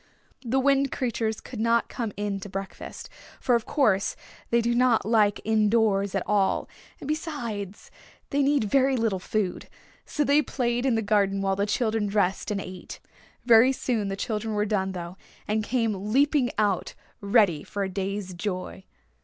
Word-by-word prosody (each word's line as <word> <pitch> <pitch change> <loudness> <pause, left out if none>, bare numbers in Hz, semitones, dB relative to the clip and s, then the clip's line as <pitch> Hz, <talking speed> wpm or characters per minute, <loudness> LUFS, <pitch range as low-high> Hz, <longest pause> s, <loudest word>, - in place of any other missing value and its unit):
The 250 +2 0
Wind 275 0 +2
Creatures 225 -4 -2
would 240 - -6
not 230 +1 +2
come 230 -3 -4
in 205 -1 -2
to 200 - -8
breakfast, 195 0 -7 0.3
for 250 - +1
of 235 -2 +1
course 210 -9 +2 0.3
they 235 - +3
do 235 +1 +1
not 240 -3 +3
like 215 -2 +3
in 215 -1 +2
doors 200 -3 +2
at 195 - 0
all, 200 -2 +1 0.3
and - - -8
besides, 235 - -4 0.4
they 285 - +2
need 280 -2 +3
very 265 +4 +2
little 225 -5 0
food. 190 0 -2 0.4
So 295 - 0
they 285 +1 +4
played 245 -2 -1
in 250 - +2
the 225 - 0
garden 200 -1 +2
while 195 0 0
the 200 +1 0
children 220 -1 0
dressed 200 -2 0
and 205 -2 -1
ate. 185 -2 -8 0.5
Very 235 +2 +7
soon 235 -5 -1
the 195 - -2
children 215 0 -2
were 210 0 +1
done, 190 -3 -1
though, 175 0 -7 0.3
and 215 +1 0
came 215 -4 -1
leaping 280 0 +3
out 205 -4 0 0.2
ready 200 -7 +3
for 200 - -4
a - - -1
day's 195 0 -4
joy. 185 0 -5
215 Hz, 170 wpm, -26 LUFS, 195-240 Hz, 0.5 s, Very